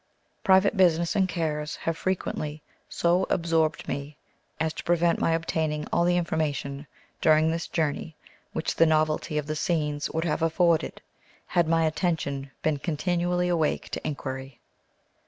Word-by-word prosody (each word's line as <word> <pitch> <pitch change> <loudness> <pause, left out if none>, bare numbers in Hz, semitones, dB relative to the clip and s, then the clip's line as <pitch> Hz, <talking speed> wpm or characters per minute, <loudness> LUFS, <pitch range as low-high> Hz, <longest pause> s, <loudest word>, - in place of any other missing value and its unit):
Private 190 +3 +5
business 170 -2 +3
and 190 -2 +2
cares 150 -3 -2
have 165 - -2
frequently 155 -4 -3 0.3
so 175 +2 +2
absorbed 165 -2 +1
me 145 +2 -5 0.4
as 160 0 0
to - - -7
prevent 170 0 +2
my 165 - +3
obtaining 160 -2 -1
all 170 - +3
the 175 0 +3
information 150 -4 -2 0.3
during 155 0 +4
this 165 0 -3
journey 155 0 -2 0.4
which - - -2
the 165 - +4
novelty 155 0 +1
of 150 - -1
the 155 +1 -3
scenes 150 -2 -1
would 160 +1 -2
have 155 -1 0
afforded, 165 0 +2 0.4
had 170 -2 +1
my 165 0 +3
attention 155 -4 -1
been 155 -2 +1
continually 175 +3 0
awake 165 -4 0
to - - -3
inquiry. 135 -3 -5
160 Hz, 145 wpm, -26 LUFS, 150-170 Hz, 0.4 s, Private